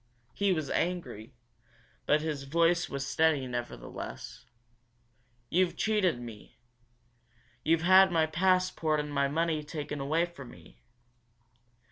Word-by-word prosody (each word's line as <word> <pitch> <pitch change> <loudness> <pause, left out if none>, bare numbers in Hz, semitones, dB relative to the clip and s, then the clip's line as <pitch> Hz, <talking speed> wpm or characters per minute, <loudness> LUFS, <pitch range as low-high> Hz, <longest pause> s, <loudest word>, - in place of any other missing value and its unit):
He 200 -1 +1
was 155 -6 -1
angry, 145 -9 -3 0.7
but 150 +1 +3
his 150 -3 -4
voice 170 +4 +2
was 140 0 -4
steady 155 -1 +2
nevertheless. 120 -1 -7 1.0
"You've 180 +5 +1
cheated 205 - +1
me. 115 -4 -11 1.1
You've 165 0 +2
had 190 +1 +7
my 165 -2 +3
passport 175 -2 +1
and 150 0 -4
my 140 0 +2
money 160 +1 -1
taken 150 -1 -5 0.3
from 140 -7 -10
me. - - -16
155 Hz, 110 wpm, -30 LUFS, 140-175 Hz, 1.1 s, had